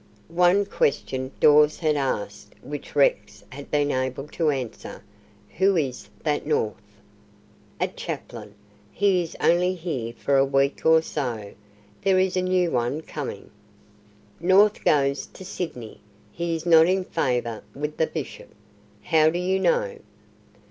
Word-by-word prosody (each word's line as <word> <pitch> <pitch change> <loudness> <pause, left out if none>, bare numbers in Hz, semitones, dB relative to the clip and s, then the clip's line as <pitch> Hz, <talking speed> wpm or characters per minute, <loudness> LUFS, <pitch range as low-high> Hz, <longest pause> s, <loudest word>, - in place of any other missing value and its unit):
One 180 +4 +3
question 130 -7 -1
Dawes 150 0 +5
had 155 -3 +1
asked 105 -7 -3
which 145 0 -8
Rex 120 -7 +1
had 140 +2 -10
been 145 -1 +1
able 130 +2 -2
to 160 -1 0
answer: 130 -5 -5 0.6
"Who 195 -1 +4
is 135 -5 -3
that 150 -2 0
North?" 110 -9 -1 1.0
"A - - +1
chaplain. 105 - -7 0.4
He 195 -3 +2
is 165 - -7
only 180 +2 +2
here 140 -10 -4
for 140 +3 0
a 135 - +5
week 135 +2 +1
or 160 0 +6
so. 115 -11 -4 0.5
There 195 -1 +3
is 185 0 +1
a 185 - +1
new 180 -2 +1
one 125 +5 -1
coming. 145 -10 -7 0.9
North 195 +5 +4
goes 140 -2 +2
to 190 - -13
Sydney. 145 - -6 0.3
He 170 0 -2
is 160 +1 -6
not 165 -1 +6
in 190 +1 +1
favour 120 -8 -2
with 150 +2 -4
the 160 - +2
Bishop." - - -7 0.5
"How 155 -1 +4
do 170 - -2
you 185 +2 0
know?" 485 - 0
150 Hz, 140 wpm, -24 LUFS, 135-180 Hz, 1.0 s, or